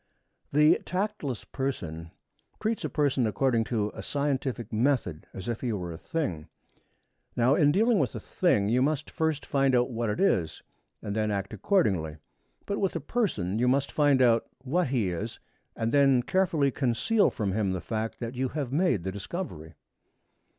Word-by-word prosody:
The 150 +2 +5
tactless 185 - -3
person 85 - -4 0.5
treats 220 +1 -1
a - - -1
person 140 -6 +1
according 115 0 +1
to 105 -3 -1
a - - -7
scientific 135 -5 -2
method 110 - 0
as 95 - -8
if 115 -1 -3
he 125 - -1
were 90 -4 -4
a 80 - -7
thing. 90 - -3 0.9
Now, 125 +3 +4
in 145 -1 +4
dealing 220 +5 +3
with - - 0
a - - -3
thing, 105 - +1
you 120 +4 +2
must 145 +1 0
first 160 -2 -1
find 135 -2 +2
out 125 +1 +2
what 115 -1 -1
it 105 - -2
is, 85 - +1 0.4
and 100 - -3
then 110 -1 +1
act 100 -1 -2
accordingly. 95 - +1 0.5
But 200 - -2
with 195 -3 0
a - - 0
person, 135 - -1
you 125 - +2
must 135 +2 +2
first - - -24
find 145 -3 +4
out 115 -2 +3 0.2
what 170 +6 +1
he 120 -8 0
is 105 +7 -4 0.4
and 115 0 -1
then 135 -3 +4
carefully 165 -4 +2
conceal 145 - +2
from 100 -3 -2
him 100 0 0
the 95 0 -1
fact 110 +3 -4
that 115 0 -4
you 130 0 -1
have 135 -3 -4
made 160 - +2
the 95 - -2
discovery. 95 - -6
125 Hz, 180 wpm, -28 LUFS, 105-150 Hz, 0.9 s, The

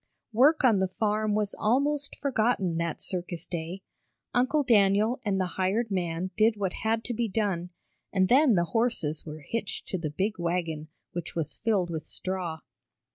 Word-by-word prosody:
Work 285 +7 +5
on 225 -6 +5
the 190 - +2
farm 215 +2 0
was 210 -1 0
almost 280 +6 +1
forgotten 220 -9 +1
that 170 -2 -2
circus 175 -2 -3
day. 175 +3 -5 0.5
Uncle 260 +5 +2
Daniel 215 +2 +3
and 200 -4 0
the 185 - +1 0.2
hired 210 +4 +1
man 180 -1 -1
did 220 0 +3
what 195 -3 -1
had 225 +1 -1
to 245 - -3
be 235 0 0
done, 190 -4 -1 0.4
and 190 -2 +3
then 260 0 +5
the 170 - +3
horses 225 -11 0
were 155 0 -7
hitched 230 -3 -3
to 185 - -2
the 160 -2 -2
big 190 +7 -2
wagon, 170 -3 -2 0.2
which 175 -1 -5
was 165 -4 -2
filled 200 -6 +1
with 160 -2 -5
straw. 180 -4 -4
200 Hz, 170 wpm, -28 LUFS, 175-225 Hz, 0.5 s, Work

